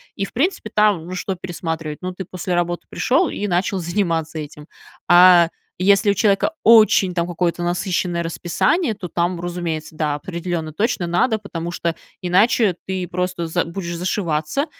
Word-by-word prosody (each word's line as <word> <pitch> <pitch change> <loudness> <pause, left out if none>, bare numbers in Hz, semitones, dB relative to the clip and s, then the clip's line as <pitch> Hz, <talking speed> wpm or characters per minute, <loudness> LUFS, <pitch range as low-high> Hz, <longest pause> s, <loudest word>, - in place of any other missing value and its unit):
И, 195 - -2
в - - -13
принципе, 280 - -1
там, 210 -6 +2
ну, 185 - -5
что 190 +1 -3
пересматривать? 165 -4 -5
Ну, 185 0 -4
ты 190 +1 -7
после 180 +1 -4
работы 175 0 -1
пришел 325 +7 +1
и 205 - -3
начал 185 +1 0
заниматься 165 -3 -1
этим. 150 0 -9 0.4
А 175 -1 +7 0.3
если 200 +2 +4
у 200 - +3
человека 205 - +2
очень 215 -4 +6
там 170 -1 -1
какое-то 175 0 -1
насыщенное 175 0 -1
расписание, 195 - 0
то 190 -4 -7
там, 175 +1 -1
разумеется, 170 -3 -4
да, 150 -2 -1
определенно 170 0 -4
точно 205 0 0
надо, 220 +7 +1
потому 175 -5 -6
что 170 -1 -2 0.2
иначе 195 +2 +3
ты 185 -1 -3
просто 180 -1 -2
за 160 - 0
будешь 170 0 -5
зашиваться, 170 - -1
180 Hz, 160 wpm, -20 LUFS, 170-195 Hz, 0.4 s, А